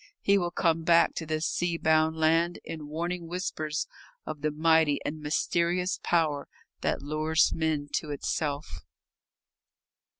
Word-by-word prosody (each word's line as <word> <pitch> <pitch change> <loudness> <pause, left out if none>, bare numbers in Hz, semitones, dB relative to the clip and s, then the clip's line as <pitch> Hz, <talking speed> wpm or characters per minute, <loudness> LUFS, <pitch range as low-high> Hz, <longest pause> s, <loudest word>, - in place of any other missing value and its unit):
He 200 0 +3
will 175 -2 -1
come 165 -2 +1
back 170 +1 +4
to 160 - -5
this 155 0 -1
sea 175 -1 0
bound 160 0 +2
land 165 +2 +2
in 155 -2 -7
warning 170 +3 -3
whispers 160 -3 -3 0.4
of 150 - -6
the 155 - +1
mighty 160 -1 +3
and 155 +1 -4
mysterious 170 +4 0
power 155 -4 +1 0.3
that - - -1
lures 155 +2 +2
men 155 -3 -1
to 155 - -5
itself. 145 +1 -3
160 Hz, 135 wpm, -28 LUFS, 155-170 Hz, 0.4 s, back